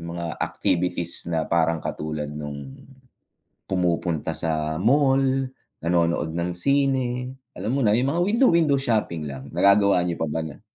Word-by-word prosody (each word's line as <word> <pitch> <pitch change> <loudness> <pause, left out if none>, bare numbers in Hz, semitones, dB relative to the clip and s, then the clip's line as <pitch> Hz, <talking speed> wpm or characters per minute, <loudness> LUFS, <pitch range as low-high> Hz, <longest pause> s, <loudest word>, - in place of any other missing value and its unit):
mga 85 -1 -6
activities 85 -1 0
na 80 -2 0
parang 85 -1 +1
katulad 75 -1 -3
no'ng 70 -2 -7 1.0
pumupunta 85 -3 0
sa 80 0 -2
mall, 135 +3 +4 0.6
nanonood 85 -1 0
ng 85 +1 -2
sine, 130 +1 0 0.2
alam - - -4
mo 135 -1 +1
na, 105 - +4
'yung 125 +5 +2
mga 170 +4 +1
window 230 +6 +4
window 160 -5 +3
shopping 105 - -1
lang, 70 +1 -9
nagagawa 100 +1 +4
niyo 85 -1 -2
pa 80 - -1
ba 80 +2 -2
na? 80 +3 -8
85 Hz, 145 wpm, -24 LUFS, 80-125 Hz, 1.0 s, mall